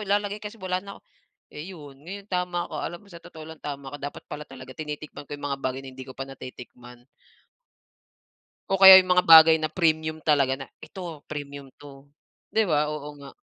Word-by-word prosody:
ilalagay 205 Hz, +1 st, 0 dB
kasi 210 Hz, +2 st, -8 dB
wala 185 Hz, -2 st, -3 dB
na 200 Hz, 0 st, -10 dB, 0.6 s
eh, 150 Hz, +5 st, -8 dB
'yon, 145 Hz, -7 st, -12 dB
ngayon 195 Hz, +6 st, -9 dB
tama 180 Hz, -1 st, -1 dB
ka. 155 Hz, -, -7 dB
Alam 175 Hz, 0 st, -5 dB
mo, -, -, -20 dB
sa 170 Hz, -, -11 dB
totoo 160 Hz, -2 st, -12 dB
lang 160 Hz, 0 st, -11 dB
tama 140 Hz, -1 st, -7 dB
ko -, -, -5 dB
dapat 145 Hz, +1 st, -7 dB
pala 150 Hz, 0 st, -7 dB
talaga 130 Hz, -1 st, -11 dB
tinitikman 150 Hz, 0 st, -8 dB
ko 145 Hz, -, -6 dB
'yong 145 Hz, 0 st, -6 dB
mga 135 Hz, -, -4 dB
bagay 130 Hz, 0 st, -3 dB
na 130 Hz, -, -9 dB
hindi 130 Hz, 0 st, -10 dB
ko 130 Hz, -, -11 dB
pa 135 Hz, -, -4 dB
natitikman. 125 Hz, -2 st, -12 dB, 1.7 s
O 195 Hz, 0 st, 0 dB
kaya 190 Hz, 0 st, +12 dB
yung 185 Hz, -1 st, +4 dB
mga 180 Hz, -, +3 dB
bagay 160 Hz, 0 st, +10 dB
na 155 Hz, -, -1 dB
premium 160 Hz, -1 st, 0 dB
talaga 140 Hz, -3 st, +2 dB
na 135 Hz, -, -8 dB, 0.2 s
eto 170 Hz, -6 st, -9 dB
premium 140 Hz, -2 st, -7 dB
'to. 140 Hz, -1 st, -14 dB, 0.4 s
Di 220 Hz, -1 st, +2 dB
ba, 150 Hz, -3 st, +1 dB
oo 150 Hz, -1 st, -6 dB
nga. 140 Hz, -, -10 dB
150 Hz, 200 wpm, -25 LUFS, 140-180 Hz, 1.7 s, kaya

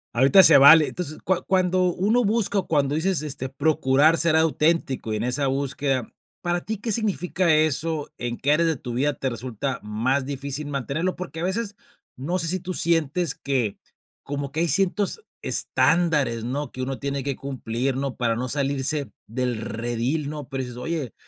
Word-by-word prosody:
Ahorita 135 Hz, +10 st, +6 dB
se -, -, +9 dB
vale, 150 Hz, +3 st, +8 dB
entonces, 155 Hz, -4 st, -5 dB
cua 185 Hz, -1 st, 0 dB
cuando 185 Hz, -1 st, +2 dB
uno 220 Hz, +6 st, +1 dB
busca, 205 Hz, -1 st, +1 dB
o, -, -, -5 dB
cuando 145 Hz, -2 st, +1 dB
dices, 170 Hz, -1 st, +1 dB
este, 140 Hz, -3 st, -4 dB
procurar 145 Hz, +2 st, +2 dB
ser 165 Hz, -1 st, +3 dB
auténtico 160 Hz, -7 st, +1 dB
y -, -, 0 dB
en 105 Hz, -, -2 dB
esa 130 Hz, +3 st, 0 dB
búsqueda, 135 Hz, -2 st, -1 dB, 0.3 s
¿para 175 Hz, 0 st, 0 dB
ti 220 Hz, -2 st, -4 dB
qué 225 Hz, +1 st, -3 dB
significa 185 Hz, -5 st, +1 dB
eso? 155 Hz, 0 st, +1 dB
¿En 120 Hz, -1 st, -3 dB
qué 140 Hz, +3 st, +1 dB
áreas 165 Hz, +2 st, +3 dB
de 160 Hz, -, +1 dB
tu 125 Hz, -2 st, -7 dB
vida 145 Hz, +3 st, +1 dB
te 135 Hz, -, -3 dB
resulta 125 Hz, +2 st, -4 dB
más 120 Hz, +6 st, -1 dB
difícil 140 Hz, +1 st, -4 dB
mantenerlo? 145 Hz, +6 st, -2 dB
Porque 165 Hz, -3 st, -7 dB
a 170 Hz, -, -3 dB
veces, 205 Hz, +1 st, -3 dB, 0.4 s
no 170 Hz, +8 st, -2 dB
sé 165 Hz, -, 0 dB
si 185 Hz, +1 st, -1 dB
tú 185 Hz, +1 st, -5 dB
sientes 165 Hz, -1 st, 0 dB
que, 130 Hz, -7 st, -2 dB, 0.5 s
como 140 Hz, -1 st, -4 dB
que 155 Hz, -, -3 dB
hay 170 Hz, -, +2 dB
ciertos 195 Hz, -, +1 dB, 0.2 s
estándares, 145 Hz, -4 st, +1 dB
¿no?, 140 Hz, +5 st, -4 dB
que 130 Hz, -, -6 dB
uno 135 Hz, +1 st, -4 dB
tiene 140 Hz, -1 st, -3 dB
que 140 Hz, -2 st, -3 dB
cumplir, 130 Hz, -1 st, -3 dB
¿no?, 135 Hz, -1 st, -3 dB
para 115 Hz, -2 st, 0 dB
no 125 Hz, +2 st, -3 dB
salirse 140 Hz, -1 st, -1 dB, 0.2 s
del 120 Hz, -1 st, -2 dB
redil, 120 Hz, +7 st, -2 dB
¿no? 150 Hz, -2 st, -7 dB
Pero 135 Hz, -1 st, -3 dB
dices, 125 Hz, -1 st, -8 dB
oye, 145 Hz, -, -4 dB
145 Hz, 185 wpm, -24 LUFS, 130-170 Hz, 0.5 s, se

